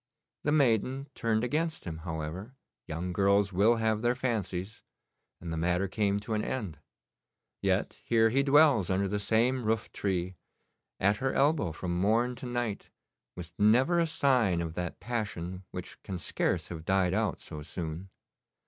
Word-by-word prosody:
The 150 - +1
maiden 135 -1 +2
turned 115 -2 0
against 160 +5 -1
him, 80 -3 -5
however 80 - -5 0.3
young 90 +3 -3
girls 100 +1 +3
will 105 +6 +4
have 110 -1 0
their 120 +1 +2
fancies 110 -5 -3 0.6
and 85 -1 -5
the - - -3
matter 90 +4 +1
came 100 +1 0
to 110 +2 -4
an 105 0 0
end. 100 - -4 0.8
Yet - - 0
here 115 -1 +3
he 135 +3 +3
dwells 140 - +5
under 95 +1 +1
the 105 +2 -1
same 120 +5 +2
roof 110 0 -1
tree, 95 -2 -2 0.6
at 100 +2 +3
her 135 0 -1
elbow 145 - +2
from 85 +2 -3
morn 115 +5 +2
to 125 - -6
night, 120 -4 -3 0.5
with 85 -1 -9
never 125 +11 +4
a 165 - +2
sign 125 - +2
of 85 -1 -3
that 90 0 -4
passion 95 -6 -4
which - - -8
can 95 - -5
scarce - - -1
have 80 -2 -6
died 95 0 +2
out - - 0
so 75 - -8
soon. 80 +3 -6
105 Hz, 160 wpm, -30 LUFS, 90-120 Hz, 0.8 s, dwells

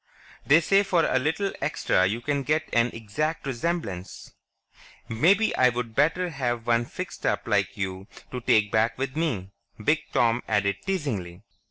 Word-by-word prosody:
"They 150 +4 +6
say 195 +4 +4
for 180 -4 +2
a 130 - +2
little 160 +8 -1
extra 95 0 +1
you 110 +5 -2
can 140 +1 -1
get 155 +3 0
an 120 0 +4
exact 145 +10 -3
resemblance. 130 - -4 0.8
Maybe 185 - +3
I'd 125 -2 +1
better 165 +7 +2
have 120 -6 -2
one 120 0 +2
fixed - - -7
up - - 0
like - - 0
you 95 0 -4 0.2
to 125 - -4
take 105 -3 +3
back 110 +2 +1
with 130 0 -3
me," 120 - -2 0.3
Big 150 +9 +2
Tom 120 0 +2
added 100 -2 +1
teasingly. 110 - -3
125 Hz, 155 wpm, -26 LUFS, 110-160 Hz, 0.8 s, They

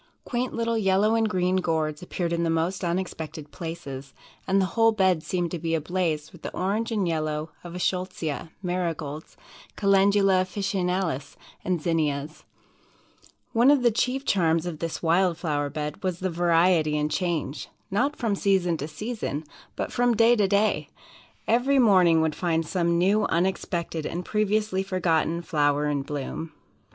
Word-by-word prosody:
Quaint 250 0 -2
little 230 0 -1
yellow 200 +2 +3
and 225 -1 +2
green 185 -1 +1
Gourds 160 -4 -1
appeared 175 -1 -3
in 170 - 0
the 170 - +1
most 165 +4 0
unexpected 165 -4 -4
places, 145 -5 -7 0.3
and 195 +1 +3
the 190 - +3
whole 225 -1 +5
bed 190 -6 +2
seemed 175 0 -2
to 175 - -3
be 165 0 -1
ablaze 160 -1 -1
with 175 - -15
the - - -5
orange 210 +5 -1
and 205 -5 0
yellow 155 -1 -2
of 175 -1 -8
the - - -5
Eschscholtzia, 180 -4 -2
Marigolds, 165 -4 -3 0.4
Calendula 195 -1 +4
Officinalis 185 -5 -2 0.3
and 175 -4 -1
Zinnias. 155 -2 -1 1.1
One 235 +4 +5
of 285 -3 +4
the 240 - +5
chief 255 +4 -1
charms 165 -3 +2
of 170 -3 -5
this 165 0 -4
wild 170 +1 +3
flower 145 -4 -1
bed 150 +1 -5
was 185 -2 -1
the 185 0 -2
variety 165 -2 +3
and 150 0 -1
change 160 -4 -2 0.2
not 275 +9 +1
from 230 -7 -1
season 190 -4 +1
to 145 - -4
season, 160 - -4 0.3
but - - -3
from 245 -1 +2
day 230 +2 +5
to 205 -4 +2
day. 205 +2 +1 0.6
Every 250 +5 +3
morning 185 -9 +5
would 160 -1 +1
find 165 0 0
some 170 0 +1
new, 200 +5 +3
unexpected, 170 -2 -1
and 175 +1 -4
previously 210 -2 0
forgotten 170 -3 0
flower 145 -3 +1
in 145 -1 0
bloom." 145 +3 -5
175 Hz, 160 wpm, -26 LUFS, 160-195 Hz, 1.1 s, whole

